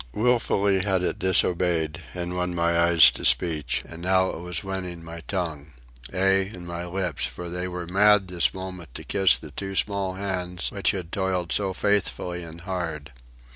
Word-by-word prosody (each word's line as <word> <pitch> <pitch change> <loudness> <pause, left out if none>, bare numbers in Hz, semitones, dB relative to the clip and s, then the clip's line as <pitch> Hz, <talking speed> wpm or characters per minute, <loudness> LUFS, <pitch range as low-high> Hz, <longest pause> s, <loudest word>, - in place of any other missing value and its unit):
Wilfully 105 -4 +2
had 95 -3 +1
it - - -1
disobeyed 85 -4 +1
and 90 0 -3
won 90 0 -1
my 85 0 +2
eyes 80 -5 +7
to - - -8
speech, 80 -5 +1
and 80 - -10
now 95 +1 +3
it - - -7
was 90 -1 -3
winning 90 -3 -5
my 85 0 -8
tongue—ay, 80 +2 -2
and 90 -4 -9
my 85 0 -5
lips, 90 -3 -1
for 90 0 -3
they 90 +1 -3
were 90 -1 -5
mad 100 +2 +4
this 90 -2 +2
moment 90 -6 -8
to - - -5
kiss 95 -2 +3
the 75 - -11
two 95 +6 -5
small 100 -2 -1
hands 90 -2 -3
which 100 - 0
had 90 -3 -3
toiled 95 -3 -1
so 100 -2 +1
faithfully 95 -2 -1
and 85 0 -9
hard. 85 -6 -4
90 Hz, 175 wpm, -25 LUFS, 85-95 Hz, -, eyes